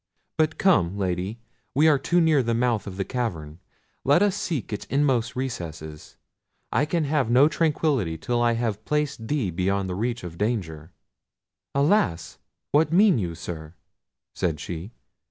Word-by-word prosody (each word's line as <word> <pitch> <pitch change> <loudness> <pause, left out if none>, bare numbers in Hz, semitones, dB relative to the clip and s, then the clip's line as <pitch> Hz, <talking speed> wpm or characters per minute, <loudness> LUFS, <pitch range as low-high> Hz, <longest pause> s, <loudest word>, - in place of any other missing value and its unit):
But 160 +1 +1
come, 100 - +3
Lady, 95 +2 -2 0.4
we 150 +3 +5
are 150 -3 +5
too 175 +6 +2
near 160 -4 +4
the 115 -1 0
mouth 120 -3 0
of 95 -1 -7
the 95 - -1
cavern; 85 - -4 0.4
let 145 +8 +4
us 205 -2 +2
seek 160 - -3
its 105 - -4
inmost 135 -5 +1
recesses. 80 - -6 0.5
I 145 - +2
can 165 +1 0
have 145 -4 0
no 130 +5 +6
tranquillity 150 - 0
till 120 +8 -1
I 120 0 +3
have 115 -3 -2
placed 150 -6 -2
thee 130 -10 0
beyond 95 +3 0
the 90 - -3
reach 115 +4 -2
of 85 -1 -8
danger." 90 -8 -2 0.8
"Alas! 140 - +1 0.3
what 150 +1 +3
mean 190 - +5
you, 85 -4 -3
sir?" 80 -1 -7 0.6
said 80 -4 -1
she. 85 +3 -6
115 Hz, 155 wpm, -25 LUFS, 90-145 Hz, 0.8 s, no